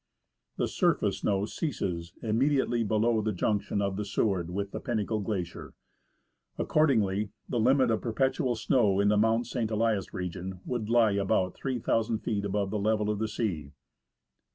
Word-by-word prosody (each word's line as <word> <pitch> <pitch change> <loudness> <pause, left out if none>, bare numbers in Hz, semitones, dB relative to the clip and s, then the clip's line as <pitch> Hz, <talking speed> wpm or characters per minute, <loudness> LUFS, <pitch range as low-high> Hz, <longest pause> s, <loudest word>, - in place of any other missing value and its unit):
The - - +1
surface - - +1
snow 100 0 0
ceases 90 - -3
immediately 120 +1 +1
below 110 +1 +2
the 110 0 -1
junction 100 +1 0
of 100 -1 -1
the 105 - -1
Seward 95 -4 0
with 100 +2 -3
the - - -4
Pinnacle 110 -3 -1
Glacier. 95 -5 -4 0.8
Accordingly, 110 -9 +2 0.2
the 120 - -1
limit 130 +1 +4
of 110 - 0
perpetual 130 +2 0
snow 110 -3 +2
in 100 0 +4
the 105 - +3
Mount 115 +3 +2
St. 115 -4 -2
Elias 110 -3 0
region 90 +1 -5
would 120 -4 -3
lie 115 -2 +4
about 95 -2 +1
3,000 115 -3 -1
feet 105 -2 -2
above 100 -1 -1
the 105 - -1
level 105 0 +1
of 105 - -3
the 110 - 0
sea. 95 -10 -3
105 Hz, 155 wpm, -29 LUFS, 100-115 Hz, 0.8 s, limit